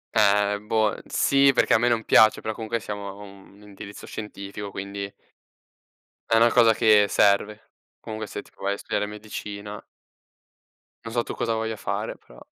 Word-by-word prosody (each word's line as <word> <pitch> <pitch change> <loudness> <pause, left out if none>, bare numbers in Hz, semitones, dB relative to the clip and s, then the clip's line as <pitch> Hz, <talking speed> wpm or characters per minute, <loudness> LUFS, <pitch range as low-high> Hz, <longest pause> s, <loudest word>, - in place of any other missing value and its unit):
Eh 105 -1 +3
boh, 110 0 +1
sì 140 0 +3
perché - - +3
a 110 - +5
me 120 - +2
non 115 -2 +1
piace, 110 0 +5
però 110 - -3
comunque 115 +1 -3
siamo 105 -1 -6
a - - -7
un 100 0 -15
indirizzo 100 0 -11
scientifico, 100 -1 -7
quindi 100 0 -6 1.2
è - - +3
una 115 +1 +5
cosa 115 -2 +5
che 105 -1 +5
serve. 105 +2 +1 0.3
Comunque 110 0 -6
se - - -6
tu - - -22
vuoi 100 +1 -2
studiare 105 - -2
medicina. 105 0 -8 1.2
Non 115 - -6
so 120 -1 +1
tu - - -6
cosa 115 - -1
voglia 110 0 -2
fare, - - -4
però - - -18
105 Hz, 165 wpm, -24 LUFS, 100-110 Hz, 1.2 s, a